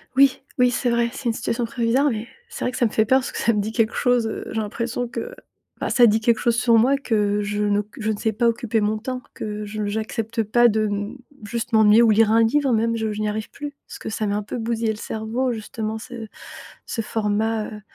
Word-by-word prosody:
Oui, 275 0 +4 0.2
oui, 250 -1 +4
c'est 245 0 0
vrai, 235 0 +2
c'est 275 - -8
une 235 - +2
situation 235 +1 -2
provisoire, 245 +4 +1
mais 225 0 -4 0.2
c'est - - -6
vrai 250 - 0
que - - -6
ça 245 - +3
me 220 - 0
fait 220 0 +2
peur 260 +4 +4
parce 265 - -5
que - - -7
ça 230 - +2
me 205 - +1
dit 215 +2 -3
quelque 225 -1 +1
chose, 245 -2 +2
heu. - - -5
J'ai 220 - -2
l'impression 230 +3 -3
que 480 - -6 0.4
bah, - - -2
ça 240 -2 +6
dit 215 0 +3
quelque 235 0 +2
chose 235 -2 +2
sur 235 -1 +3
moi, 260 +5 +4
que 210 -6 0
je 205 0 -2
ne 205 0 +2
q 210 +3 -13
je 220 +1 0
ne 205 - -3
sais 220 - 0
pas 235 +3 +2
occuper 230 -1 0
mon 210 +1 +1
temps, 255 +3 -5
que 210 0 -5
je 210 0 -4
j'accepte 220 +2 -2
pas 240 +3 +4
de, 215 0 +1
mmh, 205 +5 -3 0.3
juste 230 +3 -4
m'ennuyer 220 0 +6
ou 230 - +5
lire 215 0 +4
un 225 0 +5
livre, 270 +3 +2
même 230 +1 +1
je 220 -1 -1
je 210 - -5
n'y 210 - 0
arrive 215 0 -4
plus, 290 -1 -7
parce - - -9
que - - -6
ça 215 0 -2
m'a 205 0 0
un 210 - -3
peu 210 - -5
bousillé 230 -1 -1
le - - -4
cerveau 225 +4 -2
justement 220 -1 -4
ce 235 -2 -8 0.6
ce 225 - -3
format 215 0 -1
heu 210 -1 -9
225 Hz, 255 wpm, -22 LUFS, 215-240 Hz, 0.6 s, ça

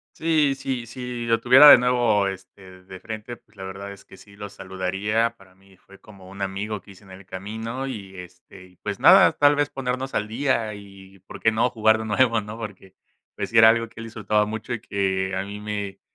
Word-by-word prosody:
Sí, 155 -4 +1
sí, 130 -3 -4
si 120 0 -6
lo 115 0 +2
tuviera 130 +5 +8
de - - +11
nuevo, 120 -5 +2
este, 95 -1 -10
de 95 0 -11
frente, 110 +2 -8
pues, 110 - -31
la 95 - -9
verdad 95 +1 -7
es 100 - -16
que - - -16
sí 100 +1 -17
lo 105 0 -8
saludaría. 100 +5 -2
Para 95 -1 -21
mi 95 0 -23
fue 100 +2 -19
como 100 -3 -16
un 100 +1 -11
amigo 100 +2 -4
que 100 - -16
hice 100 +1 -17
en 95 - -16
el 95 +1 -13
camino 110 +8 -6
y 100 -7 -8
este, 90 0 -13
y, 90 0 -22
pues, - - -6
nada, - - +7
tal 145 0 +4
vez 145 0 0
ponernos 130 0 -4
al 105 - -1
día 115 -2 -1
y 100 -1 -14
¿por 95 - -12
qué 110 - +2
no? 115 +3 +1
jugar 110 -1 +2
de 110 - -5
nuevo, 115 +1 +2
¿no? 105 +2 -9
Porque, 95 -4 -10 0.4
pues - - -4
sí, 115 - +1
era 110 0 +9
algo 115 0 +1
que 115 +1 -15
él - - -7
disfrutaba 105 -1 0
mucho 110 +3 -5
y 115 - -5
que 95 -2 -2
a 95 - -2
mí 100 +1 -8
me 105 -2 -5
105 Hz, 225 wpm, -23 LUFS, 95-115 Hz, 0.4 s, de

